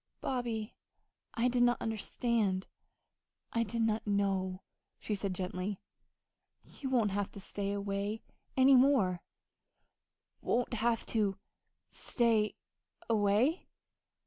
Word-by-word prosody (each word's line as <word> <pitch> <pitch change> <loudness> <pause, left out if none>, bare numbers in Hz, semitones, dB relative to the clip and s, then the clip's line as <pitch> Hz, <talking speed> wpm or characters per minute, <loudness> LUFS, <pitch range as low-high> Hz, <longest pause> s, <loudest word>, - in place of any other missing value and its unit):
"Bobby, 235 -4 -2 0.6
I 235 +1 +2
did 250 0 +1
not 245 0 +4
understand 220 -3 0 0.9
I 230 - +2
did 230 +1 -1
not 220 -1 0
know," 195 -2 0 0.3
she 215 - -3
said 200 -2 -2
gently. 185 +2 -3 0.8
"You 270 - -6
won't 230 -6 +2
have 200 0 -1
to - - -8
stay 200 0 -3
away 200 +1 -2 0.3
any 265 +1 +7
more." 250 -10 +4 1.2
"Won't 245 +1 0
have 230 0 +1
to 205 -4 +1 0.5
stay 225 -3 +1 0.6
away!" 220 - +2
215 Hz, 105 wpm, -33 LUFS, 200-240 Hz, 1.2 s, any